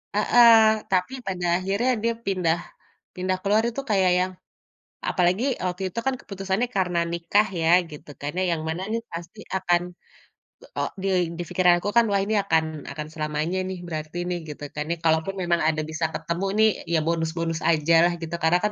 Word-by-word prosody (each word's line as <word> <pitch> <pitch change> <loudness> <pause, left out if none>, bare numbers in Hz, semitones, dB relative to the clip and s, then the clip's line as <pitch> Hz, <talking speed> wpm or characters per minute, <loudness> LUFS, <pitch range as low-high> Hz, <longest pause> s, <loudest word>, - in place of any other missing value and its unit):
heeh, 230 +2 +7 0.4
tapi 185 +7 +1
pada 180 -2 -2
akhirnya 200 +7 0
dia 230 0 +2
pindah 180 -4 +1 0.6
pindah 185 0 -1
keluar 210 +3 +3
itu 255 +4 -5
kayak 190 -3 +3
yang 185 +1 0 0.8
apalagi 185 +6 +2 0.2
waktu 180 +1 -3
itu 180 - -7
kan 265 - +2
keputusannya 195 +4 -2
karena 180 -2 +1
nikah 170 +5 +2
ya 160 - +1 0.2
gitu 150 0 -11
kan, - - -39
karena 150 +6 -3
yang 160 -2 -1
mana 165 +3 -3
nih 230 +1 -1
pasti 170 +5 -8 0.2
akan, 175 -2 +2 1.0
eee, 190 -1 -1 0.2
di - - -1
pikiranku 180 0 +3
kan 235 - +7
wah 200 - +3
ini 215 +1 0
akan 160 -5 +2 0.3
akan 150 -1 -6
selamanya 155 +3 -2
nih 185 - -5
berarti 155 0 -5
nih, 180 - -1
gitukan 150 0 -6 0.2
kalaupun 160 +4 +2 0.4
ada 155 -1 -1
bisa 160 +1 -1
ketemu 170 +3 -3
nih 220 - +7 0.3
ya 165 - +4
bonus-bonus 165 0 -1
aja 160 0 +2
lah 175 - +4
gitu 165 +1 -4
karena 170 +2 +4
kan 210 - +1
180 Hz, 165 wpm, -24 LUFS, 165-195 Hz, 1.0 s, heeh